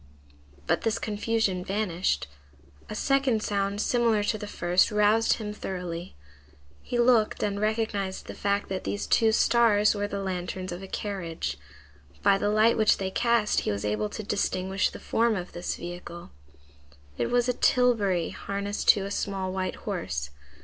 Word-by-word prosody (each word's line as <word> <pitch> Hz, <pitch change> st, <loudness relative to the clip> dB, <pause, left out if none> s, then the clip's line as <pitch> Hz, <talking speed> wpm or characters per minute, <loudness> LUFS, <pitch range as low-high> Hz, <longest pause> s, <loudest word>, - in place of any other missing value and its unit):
But -, -, +1 dB
this 225 Hz, -1 st, 0 dB
confusion 210 Hz, -3 st, -1 dB
vanished; 185 Hz, -, -1 dB, 0.6 s
a -, -, -5 dB
second 270 Hz, -2 st, +1 dB
sound 200 Hz, 0 st, -1 dB
similar 230 Hz, -2 st, +2 dB
to 215 Hz, -, 0 dB
the 210 Hz, -, -6 dB
first 175 Hz, -2 st, +2 dB
roused 210 Hz, +1 st, +3 dB
him 210 Hz, -2 st, -4 dB
thoroughly; 180 Hz, -4 st, -5 dB, 0.7 s
he 245 Hz, -, -3 dB
looked 240 Hz, -3 st, +3 dB
and 200 Hz, -1 st, -1 dB
recognized 215 Hz, -3 st, -1 dB
the -, -, -7 dB
fact 200 Hz, 0 st, -1 dB
that 190 Hz, -1 st, -3 dB
these 205 Hz, -, -3 dB
two 225 Hz, -1 st, +3 dB
stars 220 Hz, -2 st, +4 dB
were 205 Hz, -1 st, -2 dB
the 200 Hz, -1 st, -4 dB
lanterns 185 Hz, 0 st, -4 dB
of 175 Hz, +2 st, -6 dB
a 195 Hz, -, -8 dB
carriage. 190 Hz, -6 st, -4 dB, 0.6 s
By 195 Hz, -1 st, +4 dB
the 205 Hz, -, +1 dB
light 215 Hz, +3 st, +4 dB
which 215 Hz, -1 st, +4 dB
they 190 Hz, -1 st, -3 dB
cast 235 Hz, -1 st, +2 dB
he -, -, -2 dB
was 100 Hz, 0 st, -3 dB
able 105 Hz, 0 st, -1 dB
to 215 Hz, -, -6 dB
distinguish 195 Hz, -1 st, 0 dB
the -, -, -10 dB
form 230 Hz, -1 st, +1 dB
of 180 Hz, -2 st, -5 dB
this 175 Hz, -, -4 dB
vehicle. 175 Hz, 0 st, -8 dB, 0.9 s
It 120 Hz, -, 0 dB
was 245 Hz, 0 st, +2 dB
a 250 Hz, -, +2 dB
tilbury 220 Hz, -10 st, +2 dB
harnessed 200 Hz, +1 st, -4 dB
to 195 Hz, -2 st, -3 dB
a 200 Hz, -, -5 dB
small 190 Hz, -2 st, -2 dB
white 185 Hz, -1 st, -2 dB
horse. 70 Hz, +1 st, -3 dB
205 Hz, 165 wpm, -27 LUFS, 185-220 Hz, 0.9 s, stars